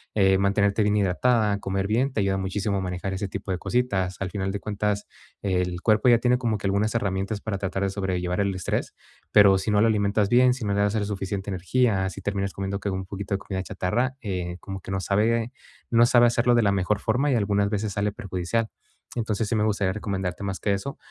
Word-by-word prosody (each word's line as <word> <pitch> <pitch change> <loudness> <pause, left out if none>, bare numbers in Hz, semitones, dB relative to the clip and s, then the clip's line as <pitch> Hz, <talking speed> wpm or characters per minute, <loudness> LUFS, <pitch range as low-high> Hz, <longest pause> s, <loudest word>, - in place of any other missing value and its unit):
eh, 95 -2 +4
mantenerte 100 +2 +2
bien 105 0 +2
hidratada, 105 +2 +2
comer 95 0 -2
bien, 125 +5 +1
te 110 - 0
ayuda 95 0 +1
muchísimo 100 +2 -1
a - - -1
manejar 90 +1 -3
ese 95 +1 -3
tipo 95 +1 -5
de 90 - 0
cositas, 95 -7 -1
al 95 - -1
final 95 0 -2
de 100 - -3
cuentas, 105 -1 -2 0.4
el 90 -2 -1
cuerpo 110 +3 +3
ya 120 - +6
tiene 125 +1 +3
como 115 -4 -1
que 100 - -2
algunas 100 +3 +1
herramientas 100 -1 -1
para 105 -3 -3
tratar 95 0 -2
de 100 - +1
sobrellevar 90 -2 -2
el 100 -1 0
estrés, 90 - -2 0.4
pero 100 -1 +7
si 100 +3 -2
no 105 - +3
lo 115 - +5
alimentas 100 -1 +1
bien, 125 +1 +5
si 125 -3 -5
no 100 - 0
le 100 - +2
das 105 +1 +1
el 105 -2 0
suficiente 100 -1 -4
energía, 95 +1 +1
si 100 - -9
terminas 100 0 -2
comiendo 100 0 -3
que 100 - -3
un 95 0 -3
poquito 100 +1 -5
de - - -3
comida 95 -2 -4
chatarra, 120 +9 -1
eh, 90 -4 -4
como 95 -1 -7
que 95 - -8
no 95 - -1
sabe 115 +4 +1 0.4
no 120 0 +6
sabe 120 0 +5
hacerlo 120 +1 +2
de 120 - +4
la 100 - +3
mejor 100 +2 0
forma 125 +7 +1
y 125 - +3
algunas 100 -1 +1
veces 105 -1 -2
sale 105 0 0
perjudicial, 100 +4 -2 0.5
entonces, 110 -2 -1
sí - - 0
me 105 - +2
gustaría 105 -3 +1
recomendarte 95 -3 -3
más 100 -1 -3
que 100 - 0
eso, 140 +9 -4
100 Hz, 225 wpm, -25 LUFS, 95-110 Hz, 0.5 s, pero